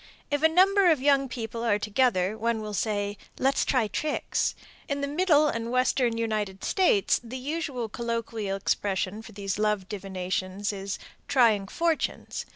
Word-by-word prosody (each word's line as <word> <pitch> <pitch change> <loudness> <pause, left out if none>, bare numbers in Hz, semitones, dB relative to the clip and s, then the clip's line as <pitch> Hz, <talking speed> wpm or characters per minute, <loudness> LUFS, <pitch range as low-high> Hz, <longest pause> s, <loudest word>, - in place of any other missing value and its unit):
If 290 0 +1
a 320 - +7
number 380 +3 +5
of 315 -4 +4
young 275 -1 +3
people 230 -1 -5
are 215 -3 +3
together, 210 -2 +1
one 230 +1 0
will 215 -1 -5
say, 205 -1 -1 0.2
"Let's 270 +1 +2
try 250 -5 +1
tricks." 300 +8 -1 0.3
In 280 -1 -2
the 280 - -1
Middle 305 0 +3
and 230 -4 -2
Western 255 -1 +2
United 215 -4 -2
States 355 - +2
the 240 +2 -6
usual 275 -3 -3
colloquial 230 -3 -3
expression 195 +1 -1
for 225 0 -12
these 195 0 -3
love 210 -3 +1
divinations 190 0 -3
is 195 0 -4 0.3
"trying 220 -7 +3
fortunes." 330 +6 -2
230 Hz, 155 wpm, -27 LUFS, 205-275 Hz, 0.3 s, a